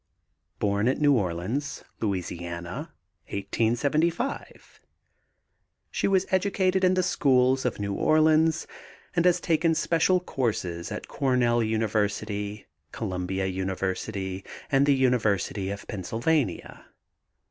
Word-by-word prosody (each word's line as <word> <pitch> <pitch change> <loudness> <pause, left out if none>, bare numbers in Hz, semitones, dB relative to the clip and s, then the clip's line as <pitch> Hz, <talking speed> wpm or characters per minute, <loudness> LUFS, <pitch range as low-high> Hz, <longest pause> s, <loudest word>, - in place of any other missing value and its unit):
Born 100 +2 +1
at 130 - +2
New 145 -1 +5
Orleans, 105 +6 -2 0.2
La., 110 - +1
1875. 110 - -3 1.1
She - - 0
was 190 -1 +3
educated 190 0 +1
in 185 0 +4
the 185 - +2
schools 130 -6 +3
of 125 - -1
New 100 -1 -2
Orleans 155 +5 +3 0.5
and 170 0 +2
has 180 -1 +4
taken 165 0 +2
special 170 +3 +2
courses 105 - -2
at 105 - -5
Cornell 125 -3 +2
University, 105 -1 -1 0.3
Columbia 95 +1 -3
University, 95 +1 -3 0.3
and 140 0 +4
the 140 - +5
University 110 -7 +1
of 100 0 -6
Pennsylvania. 115 - -2
115 Hz, 105 wpm, -26 LUFS, 100-155 Hz, 1.1 s, New